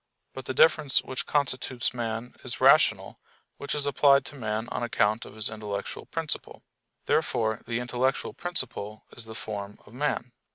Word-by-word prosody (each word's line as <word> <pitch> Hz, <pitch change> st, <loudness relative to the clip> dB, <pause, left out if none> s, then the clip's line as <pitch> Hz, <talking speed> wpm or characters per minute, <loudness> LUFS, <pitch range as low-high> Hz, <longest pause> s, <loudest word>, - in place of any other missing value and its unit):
But 130 Hz, -1 st, -8 dB
the 130 Hz, -, -3 dB
difference 155 Hz, -2 st, +5 dB
which 130 Hz, -, -4 dB
constitutes 130 Hz, -4 st, 0 dB
man 115 Hz, 0 st, -4 dB
is -, -, -4 dB
"rational," -, -, +4 dB, 0.4 s
which 140 Hz, -, -4 dB
is 145 Hz, -1 st, 0 dB
applied 140 Hz, -1 st, +5 dB
to -, -, -8 dB
man 110 Hz, -2 st, -2 dB
on -, -, -3 dB
account 110 Hz, -2 st, +1 dB
of -, -, -12 dB
his 110 Hz, -1 st, -1 dB
intellectual 105 Hz, -2 st, -5 dB
principle. -, -, -3 dB, 0.4 s
Therefore 110 Hz, -1 st, +1 dB
the 115 Hz, 0 st, -1 dB
intellectual 125 Hz, +2 st, -1 dB
principle 125 Hz, -, -2 dB
is 120 Hz, -, -7 dB
the 110 Hz, 0 st, -9 dB
form 105 Hz, -2 st, -6 dB
of 105 Hz, -, -16 dB
man. 125 Hz, -2 st, -1 dB
120 Hz, 160 wpm, -27 LUFS, 110-135 Hz, 0.4 s, difference